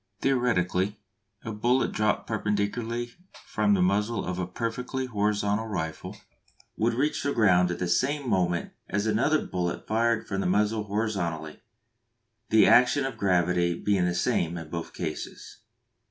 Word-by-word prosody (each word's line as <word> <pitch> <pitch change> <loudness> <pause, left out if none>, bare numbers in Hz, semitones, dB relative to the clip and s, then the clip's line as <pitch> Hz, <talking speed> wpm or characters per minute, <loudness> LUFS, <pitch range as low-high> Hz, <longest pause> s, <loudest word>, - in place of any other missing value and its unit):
(Theoretically, 105 -6 +1 0.4
a 110 - -5
bullet 120 +5 +1
dropped 105 0 0
perpendicularly 110 +3 -2 0.3
from 105 -1 +2
the 90 - +2
muzzle 105 +4 0
of 90 0 -3
a 90 - -2
perfectly 125 +6 -3
horizontal 105 -1 0
rifle 80 -7 -4 0.6
would 115 +1 +1
reach 145 +5 0
the 140 0 -1
ground 90 -5 +4
at 90 - -2
the 90 - -2
same 135 +10 0
moment 90 -5 0 0.2
as 100 +1 -1
another 115 +8 +2
bullet 90 -1 -3
fired 115 +1 +1
from 95 -1 -2
the - - 0
muzzle 105 +3 +1
horizontally, 95 -7 -3 0.9
the 110 0 +6
action 125 +3 +5
of 135 -3 -4
gravity 90 -3 +1
being 95 0 +1
the 90 0 0
same 85 -1 0
in 80 -2 -8
both 85 -1 -5
cases.) 80 +3 -6
105 Hz, 145 wpm, -27 LUFS, 90-115 Hz, 0.9 s, the